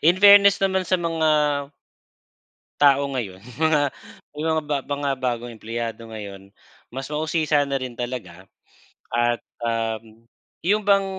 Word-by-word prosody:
in 170 +4 +4
fairness 200 0 +8
naman 190 -1 +1
sa 185 - +3
mga 165 -2 0 1.5
tao 140 -1 +4
ngayon, 100 -8 -5 0.2
mga 155 -3 +2 0.5
may 155 - -3
mga 160 -1 +1
ba 145 -1 -1
mga 145 0 -2
bagong 120 -2 -2
empleyado 115 0 -5
ngayon 100 -3 -9 0.4
mas 135 +2 -6
mausisa 155 0 +1
na 140 - -3
rin 130 -3 -4
talaga 105 -8 -6 0.7
at, 120 0 +1 0.2
um, 115 -1 -3 0.4
'yon 205 +4 +3
bang 195 -1 +5
135 Hz, 130 wpm, -23 LUFS, 115-160 Hz, 1.5 s, fairness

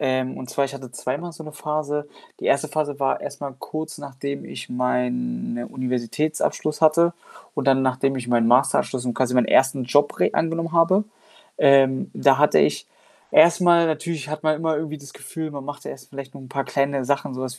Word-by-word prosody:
Ähm, 130 0 -1
und 130 0 -8
zwar 140 - +1
ich 140 0 -6
hatte 130 -3 -9
zweimal 165 +8 -4
so 160 - -10
'ne 155 - -9
Phase. 150 -1 -3 0.3
Die - - -7
1. 155 +2 +2
Phase 145 -1 -2
war 135 - +1
erst 145 0 -7
mal 140 -2 -5
kurz 155 +2 -6
nachdem 140 0 -6
ich - - -8
meinen, 125 - -1
ne, 120 0 -4
Universitätsabschluss 130 +5 -2
hatte 170 +2 +5 0.4
und 145 -3 -3
dann 135 -1 +4
nachdem 130 +1 +1
ich 125 -2 -5
meinen 120 -2 +3
Masterabschluss 125 0 +2
und 120 - -1
quasi 125 -1 0
meinen 125 - +4
1. 135 0 +3
Job 145 +4 +2
re - - +4
angenommen 165 0 -1
habe. 170 +5 +4 0.5
Ähm, 135 -1 +4
da - - +4
hatte - - +5
ich - - +1 0.4
erstmal 170 0 +6
natürlich 155 -1 -3
hat 155 0 -5
man 155 -1 +2
immer 160 0 0
irgendwie 155 0 -4
das 140 -2 -13
Gefühl, 160 -1 -6
man 140 -2 -7
macht 145 +1 -8
erst 130 - -9
vielleicht 135 -1 -9
noch - - -10
'n 130 - -12
paar 135 +1 -2
kleine 140 -1 0
Sachen, 140 0 -1
so 130 - -6
was 130 -1 -5
140 Hz, 200 wpm, -23 LUFS, 130-155 Hz, 0.5 s, erstmal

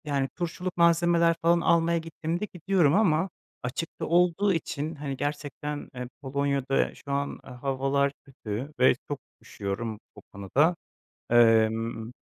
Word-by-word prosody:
Yani, 140 -2 0
turşuluk 180 +1 -4
malzemeler 170 0 +4
falan 170 0 +4
almaya 170 0 +3
gittiğimde 165 +3 -3
gidiyorum 180 -4 +2
ama 185 -3 +3 0.3
açıkta 130 +7 -4
olduğu 180 +4 +3
için, 155 -1 -3
hani, 140 -2 -5
gerçekten, 145 0 -4
eee, 125 0 -5
Polonya'da 140 -1 0
şu 140 - -9
an, 140 0 -2
eee, - - -12
havalar 135 +2 0
kötü 130 +1 -6
ve 130 - +6 0.2
çok 145 - -3 0.2
üşüyorum, 105 +2 -4 0.2
o 105 - -12
konuda. 135 - +2 0.6
Emm, 115 0 +3
145 Hz, 125 wpm, -27 LUFS, 130-170 Hz, 0.6 s, ve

